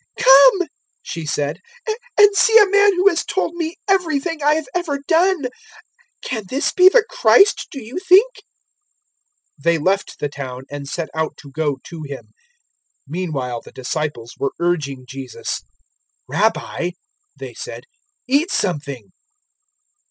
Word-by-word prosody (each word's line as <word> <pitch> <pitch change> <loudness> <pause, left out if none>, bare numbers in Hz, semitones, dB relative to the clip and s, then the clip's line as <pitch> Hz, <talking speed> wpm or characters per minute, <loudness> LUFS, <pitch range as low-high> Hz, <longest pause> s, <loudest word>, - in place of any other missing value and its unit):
004:029 - - -2
"Come," 275 +7 +7 0.4
she 165 - -6
said, 145 0 -2 0.6
"and 415 -1 +6
see 450 +2 +6
a 415 -2 +7
man 405 -1 +5
who 365 +2 +3
has 345 -4 +3
told 370 -2 -2
me 335 -1 -4
everything 330 -4 0
I 295 +1 +3
have 315 -1 -2
ever 345 -5 -1
done. 350 -2 +2 0.8
Can 230 -4 -3
this 275 +4 0
be 370 0 +7
the 450 +2 +4
Christ, - - +4
do 275 - -8
you 240 +10 -6
think?" 395 +7 +4 1.2
004:030 - - -20
They 170 0 +3
left 190 +5 -1
the 145 - -2
town 130 -3 -7
and 145 -1 -6
set 165 +2 -4
out 160 -1 -3
to 140 - -14
go 145 -1 -1
to 165 -2 -9
Him. 140 -2 -8 0.8
004:031 - - -22
Meanwhile 140 -8 -3
the - - -15
disciples 130 -3 -4
were 140 - -1
urging 145 -7 -1
Jesus. 135 -2 -6 0.7
"Rabbi," 175 - 0 0.5
they - - -8
said, - - -8 0.4
"eat 285 +7 +2
something." 140 - -3
215 Hz, 145 wpm, -19 LUFS, -, 1.2 s, Come